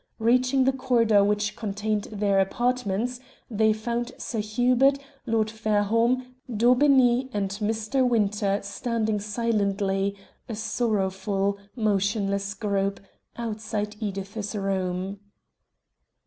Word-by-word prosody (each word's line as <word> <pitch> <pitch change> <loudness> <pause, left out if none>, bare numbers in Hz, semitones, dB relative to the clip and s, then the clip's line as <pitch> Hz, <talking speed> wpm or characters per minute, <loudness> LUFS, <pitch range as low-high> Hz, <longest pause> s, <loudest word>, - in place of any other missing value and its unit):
Reaching 250 +3 +3
the 265 - +4
corridor 235 -6 +3
which 210 +1 0
contained 210 0 -2
their 200 -2 +1
apartments 240 +2 0 0.3
they 220 0 +3
found 235 +3 -2
Sir 225 - -4
Hubert, 245 +6 +3 0.3
Lord 220 -1 +1
Fairholme, 225 +4 +1 0.2
Daubeney, 250 +2 +4
and 200 -2 -1
Mr. 220 +5 0
Winter 205 -3 +1
standing 220 +1 -1
silently, 200 -2 0 0.3
a 225 - -3
sorrowful, 200 -3 -1 0.2
motionless 200 -2 0
group, 200 -1 -1 0.4
outside 215 -2 -3
Edith's 200 0 -4
room. 190 -1 -2
215 Hz, 95 wpm, -26 LUFS, 200-235 Hz, 0.4 s, the